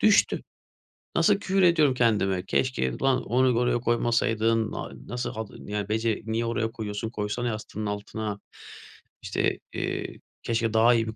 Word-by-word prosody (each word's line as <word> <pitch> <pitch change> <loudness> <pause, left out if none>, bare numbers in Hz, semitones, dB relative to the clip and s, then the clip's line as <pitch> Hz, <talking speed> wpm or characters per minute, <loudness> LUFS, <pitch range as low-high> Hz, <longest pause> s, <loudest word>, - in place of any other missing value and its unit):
Düştü. 215 -1 +4 0.7
Nasıl 205 - +5
küfür 195 -1 +1
ediyorum 165 -6 +5
kendime, 100 -6 +2
"Keşke 110 - 0
ulan 135 -1 +2
onu 125 0 +2
oraya 120 -1 +2
koymasaydın, 115 -1 +1
a - - -5 0.2
nasıl 120 0 -3
hadi, 110 -1 -7
ya 105 -1 -2
bece 110 0 0
niye 115 +1 -1
oraya 115 -1 -1
koyuyorsun 110 0 -4
koysana 110 +2 -2
yastığının 110 -1 -4
altına." 105 0 -4 0.8
İşte, - - 0
eee, - - -3 0.2
"Keşke 115 -1 0
daha 115 +2 +6
iyi 115 -1 +1
bir 110 - -5
115 Hz, 145 wpm, -27 LUFS, 110-120 Hz, 0.8 s, daha